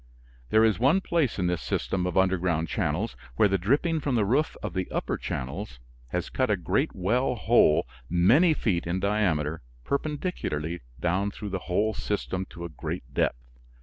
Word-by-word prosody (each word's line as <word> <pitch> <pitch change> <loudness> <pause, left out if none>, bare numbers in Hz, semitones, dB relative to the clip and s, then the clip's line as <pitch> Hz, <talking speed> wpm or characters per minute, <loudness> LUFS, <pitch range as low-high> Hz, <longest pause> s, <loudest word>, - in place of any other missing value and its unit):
There 110 - +5
is 110 -2 +2
one 140 +10 +4
place 165 - 0
in 90 - 0
this 90 -3 0
system 90 -1 -1
of 90 - -2
underground 90 -3 +2
channels 95 +4 -1 0.2
where 105 - +5
the 95 -1 +1
dripping 145 - +1
from 140 -4 -1
the 110 -3 +2
roof 135 +9 +1
of 105 -5 -3
the 95 0 -2
upper - - -2
channels 70 - -5 0.3
has - - -3
cut - - +1
a - - +2
great - - 0
well 120 +8 +1
hole 110 - +4 0.2
many 125 - +5
feet 90 -11 0
in 90 +2 0
diameter 90 -7 0 0.2
perpendicularly 140 - -2 0.2
down 90 +5 +1
through 105 0 -7
the 95 -1 -2
whole 105 +5 +2
system 95 -3 -3
to 85 0 -8
a - - -5
great 70 -4 -6
depth. - - 0
95 Hz, 175 wpm, -27 LUFS, 85-115 Hz, 0.3 s, There